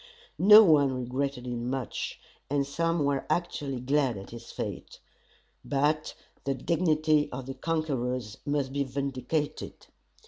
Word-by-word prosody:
No 210 +4 +10
one 145 -7 +5
regretted 130 +1 -3
him 120 0 -3
much, 130 -2 -4 0.3
and 140 0 +1
some 165 +2 0
were 140 -1 -1
actually 145 -6 -1
glad 135 -2 +1
at 95 - -10
his 115 0 -10
fate. - - -6 0.6
But 150 +2 0 0.3
the 135 0 -1
dignity 155 0 +1
of 125 0 -6
the 135 - -5
conquerors 130 -7 -2
must 145 -2 -1
be 140 0 +1
vindicated. 140 +2 -3
140 Hz, 130 wpm, -28 LUFS, 130-155 Hz, 0.6 s, No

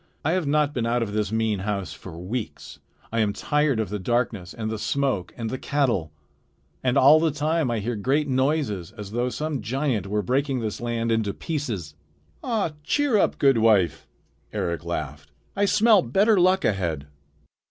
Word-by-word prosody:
"I 155 - +2
have 180 -4 0
not 150 0 +2
been 120 -4 -1
out 120 0 +1
of 105 -2 -5
this 105 -1 -1
mean 110 -2 0
house 100 -1 -3
for 85 -3 -10
weeks. 105 +7 -6 0.3
I 115 - 0
am 105 -2 +2
tired 150 +2 +1
of 110 - -1
the 105 +1 -3
darkness 110 -3 -1
and 110 -1 -4
the 110 - -4
smoke 130 -9 -1
and 115 -2 -4
the 130 - -4
cattle. 120 - 0 0.7
And 125 -1 +2
all 145 +4 +7
the 165 0 +2
time 155 0 0
I 120 - 0
hear 115 +3 -2
great 135 +8 0
noises, 130 - 0
as 105 -2 -7
though 120 +3 0
some 150 0 -3
giant 120 -2 -1
were 105 +1 -1
breaking 135 +4 0
this 110 -1 -4
land 115 -1 -1
into 110 -3 0
pieces." 115 - -4 0.5
"Ah, 220 -9 0
cheer 255 - +2
up, - - +1
good 135 -4 +4
wife!" 105 -7 +3 0.4
Eric 85 -1 -2
laughed. 75 -3 -5 0.3
"I 205 - +2
smell 210 0 +5
better 195 - +3
luck 185 +1 +3
ahead." 85 -8 -1
120 Hz, 180 wpm, -24 LUFS, 105-150 Hz, 0.7 s, all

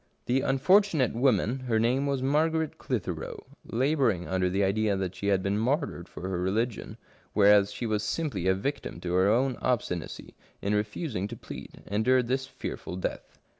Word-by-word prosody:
The 130 +2 +2
unfortunate 155 - +3
woman, 120 0 +2
— 130 - -9
her 115 -2 +2
name 125 +5 +2
was 135 -2 -1
Margaret 160 +3 +1
Clitheroe, 90 -10 -4 0.2
— - - -44
labouring 125 - +1
under 95 -1 +1
the 95 +2 +1
idea 100 +1 +1
that 95 -1 -2
she 100 +2 -2
was 100 - +4
being 100 +2 0
martyred 125 - -1
for 95 - -7
her 95 -2 -2
religion, 105 +6 -2 0.4
whereas 100 -1 +5
she 120 - -4
was 105 -2 0
simply 105 - -2
a 95 - +4
victim 105 -2 -4
to 90 -1 -3
her 95 +2 +4
own 125 +3 +2
obstinacy 105 -9 -2 0.3
in 100 - -1
refusing 105 - -2
to - - -8
plead, - - -10
endured 120 +4 +2
this 130 +1 0
fearful 110 - -6
death. 95 - -5
110 Hz, 175 wpm, -28 LUFS, 95-130 Hz, 0.4 s, whereas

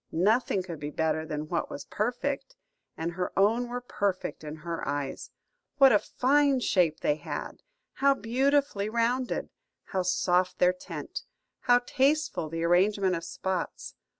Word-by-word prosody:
Nothing 200 +2 +2
could 170 -4 -7
be 145 - -4
better 160 +1 -1
than 150 -1 -4
what 170 +1 -2
was - - -7
perfect, 260 +5 -2 0.4
and 165 +1 -2
her 180 +1 -3
own 225 +5 +3
were 245 +1 -4
perfect 200 -9 -2
in 150 0 -6
her 170 -1 -3
eyes. 140 -1 -3 0.5
What 270 -1 +8
a 210 - +5
fine 280 +3 +2
shape 170 -8 +2
they 150 - +1
had! 145 - -6 0.3
How 275 +1 +3
beautifully 260 -2 +1
rounded! 235 +3 0 0.3
How 190 - -2
soft 180 0 +1
their 180 0 +4
tint! 180 - -7 0.5
How 245 0 +7
tasteful 280 - +1
the 165 +1 -3
arrangement 185 +2 +3
of 165 - -4
spots! 185 0 -4
195 Hz, 150 wpm, -28 LUFS, 170-245 Hz, 0.5 s, What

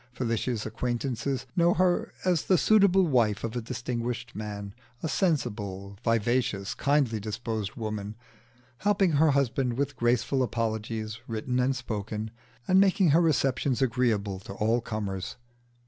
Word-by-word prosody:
Felicia's 115 -2 -1
acquaintances 125 +3 -2
know 175 -1 +4
her 180 0 +2
as 180 -3 +2
the 185 - +4
suitable 195 -1 +5
wife 115 -9 +2
of 115 +1 -3
a 120 - -1
distinguished 120 0 -4
man, 100 -1 -6 0.3
a - - 0
sensible, 105 - -1
vivacious, 115 -2 +1
kindly 140 -6 +1
disposed 110 0 -4
woman, 105 -2 -4 0.6
helping 200 -3 +2
her 155 +1 +4
husband 135 -2 +1
with 140 +2 -2
graceful 120 +3 +1
apologies 110 -2 -2
written 125 +3 -2
and 130 +2 +2
spoken, 110 -2 -4 0.4
and 185 +1 +5
making 195 -2 +4
her 165 +4 +5
receptions 135 -5 +1
agreeable 115 -6 +1
to 95 - -9
all 110 +4 +1
comers. 100 -4 -4
120 Hz, 130 wpm, -28 LUFS, 110-140 Hz, 0.6 s, suitable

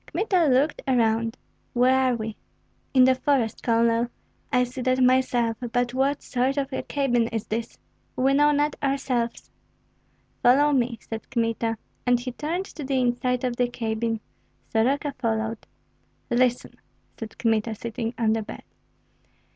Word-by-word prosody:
Kmita 370 -6 +1
looked 270 +4 +2
around. 230 -2 +1 0.4
"Where 250 +2 +4
are 260 -1 +2
we?" 220 -1 -5 0.6
"In 260 -1 +6
the 260 0 +6
forest, 255 -4 0
Colonel." 230 0 +2 0.4
"I 250 0 +4
see 250 +1 -5
that 255 +1 +1
myself. 250 -3 +3
But 245 0 0
what 275 +2 0
sort 260 +2 0
of 275 -1 -2
a - - -1
cabin 245 -5 +1
is 225 -1 -3
this?" 225 +2 -4 0.4
"We 265 +2 +2
know 295 +1 +5
not 295 0 +1
ourselves." 265 -4 -1 0.9
"Follow 285 +4 +5
me," 245 -4 +1
said 225 -1 -7
Kmita. 230 -2 -1 0.3
And 245 -1 +4
he 250 +1 -5
turned 325 +9 -3
to 310 - -9
the 265 -1 0
inside 250 0 0
of 245 -2 -1
the 245 - +2
cabin. 225 -1 -2 0.5
Soroka 275 +6 +1
followed. 225 -2 -2 0.6
"Listen," 245 0 +1 0.4
said 225 -1 -8
Kmita, 225 -1 0
sitting 230 +1 -4
on 225 -2 +2
the 225 - 0
bed. 210 - -9
245 Hz, 145 wpm, -25 LUFS, 230-265 Hz, 0.9 s, In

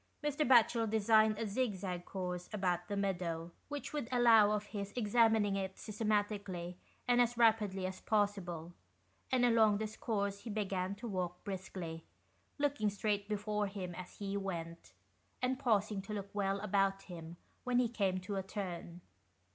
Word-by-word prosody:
Mr. 295 +1 +1
Batchel 235 -2 +5
designed 220 0 +4
a 225 - -2
zig 215 +1 0
zag 180 -2 -4
course 180 -2 -4
about 180 -4 0
the 205 - -2
meadow, 175 -4 -2 0.2
which 290 +1 -5
would 290 -6 -2
allow 230 -4 +6
of 210 0 0
his 200 -1 -5
examining 220 -3 +3
it 190 -1 -3
systematically 205 -4 -2 0.3
and 245 0 +5
as 240 0 +1
rapidly 215 -5 +3
as 185 0 -5
possible, 190 -6 -1 0.6
and 250 -1 +4
along 220 -3 +5
this 215 0 -4
course 200 -3 -1
he 235 - -8
began 195 -2 -1
to 210 +4 -7
walk 180 -3 -3
briskly, 180 -4 -5 0.5
looking 285 -7 +1
straight 205 0 -1
before 210 0 -1
him 190 -3 -5
as 180 +1 -9
he 200 -1 -3
went, 170 - -5 0.5
and 255 +1 0
pausing 215 -5 +1
to 200 +2 -7
look 200 -1 -6
well 200 -1 0
about 195 -1 +1
him 170 -2 -9 0.3
when 250 -1 +1
he 250 -1 +4
came 195 -5 0
to 195 +2 -4
a - - 0
turn. 180 -3 -6
205 Hz, 160 wpm, -35 LUFS, 185-220 Hz, 0.6 s, allow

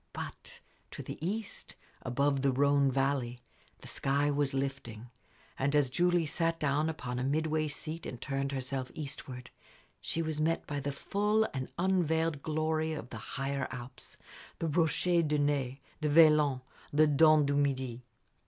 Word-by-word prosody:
But - - -7 0.3
to - - -8
the - - -8
east, 205 +4 -4 0.3
above 140 +2 +1
the 135 0 +3
Rhône 140 +1 +3
valley, 135 -2 0 0.4
the - - -10
sky 140 +2 +1
was 145 -1 +1
lifting; 135 -4 -4 0.5
and 140 +2 +1
as 140 -4 +3
Julie 175 +2 +2
sat 165 +2 0
down 150 +2 +1
upon 125 -6 -4
a - - -1
midway 155 +2 0
seat 155 +2 -5
and 125 - -7
turned 135 +1 -2
herself 130 -1 -3
eastward, 135 -4 -6 0.5
she 165 - -1
was 155 -1 -2
met 165 +2 +1
by 145 -1 -3
the 145 +1 -2
full 210 +8 +1
and 130 -2 -4
unveiled 165 -4 +1
glory 155 +1 0
of 130 -5 -7
the 115 - -6 0.2
higher 135 0 -1
Alps 125 0 -9 0.4
the 165 - -2
Rochers 165 +2 +2
de 150 0 +1
Naye, 140 -2 0 0.2
the 155 -1 0
Velan, 150 -4 +5 0.3
the 155 +2 +5
Dent 155 0 +5
du 140 - 0
Midi. 130 -4 0
145 Hz, 155 wpm, -31 LUFS, 135-160 Hz, 0.5 s, Velan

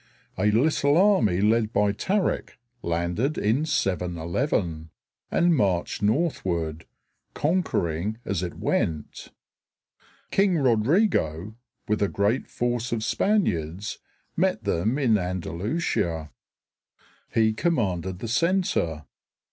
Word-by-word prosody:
A 105 +3 +2
little 145 +5 +3
army 130 - +4
led 110 +1 +2
by 105 -2 +2
Tarik 190 - -1 0.2
landed 85 - -1
in 115 +9 +1
711 85 - -1 0.4
and 175 -1 +3
marched 95 - 0
northward, 95 - -1 0.5
conquering 110 - 0
as 100 -4 -1
it 90 -2 -4
went. 75 -3 -2 1.0
King 195 -3 +3
Rodrigo, 115 - +1 0.3
with 105 0 0
a 100 - +3
great 100 +8 0
force 120 0 -2
of 115 -2 -1
Spaniards, 105 - 0 0.4
met 175 -10 +1
them 100 +5 0
in 120 -7 +3
Andalusia. 90 - -2 1.0
He 110 -1 +3
commanded 95 - -1
the 115 - -6
center. 115 - 0
105 Hz, 100 wpm, -25 LUFS, 85-140 Hz, 1.0 s, army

